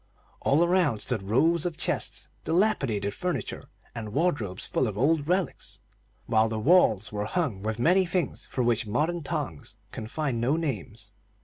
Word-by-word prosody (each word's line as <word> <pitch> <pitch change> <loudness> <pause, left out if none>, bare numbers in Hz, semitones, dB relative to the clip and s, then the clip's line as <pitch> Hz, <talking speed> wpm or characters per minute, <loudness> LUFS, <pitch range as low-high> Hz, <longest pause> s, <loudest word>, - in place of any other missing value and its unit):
All 145 +5 +3
around 175 - +2
stood 120 -2 -2
rows 145 +12 +2
of 175 -3 -3
chests, - - -1 0.2
dilapidated 135 - +1
furniture, 175 - -4 0.2
and 110 -3 -6
wardrobes 140 - 0
full 130 - 0
of 105 -2 -4
old 145 +4 +2
relics, 180 -2 -1 0.5
while 110 0 +3
the 110 - -3
walls 110 - +4
were 105 0 -2
hung 125 - -1
with 110 +1 -2
many 180 +9 +3
things 175 -4 -2
for 125 - -1
which 115 -2 +1
modern 155 +10 0
tongues 140 - -5
can 110 - -6
find 135 -2 -2
no 130 +6 +2
names. 110 - -4
130 Hz, 155 wpm, -27 LUFS, 110-170 Hz, 0.5 s, walls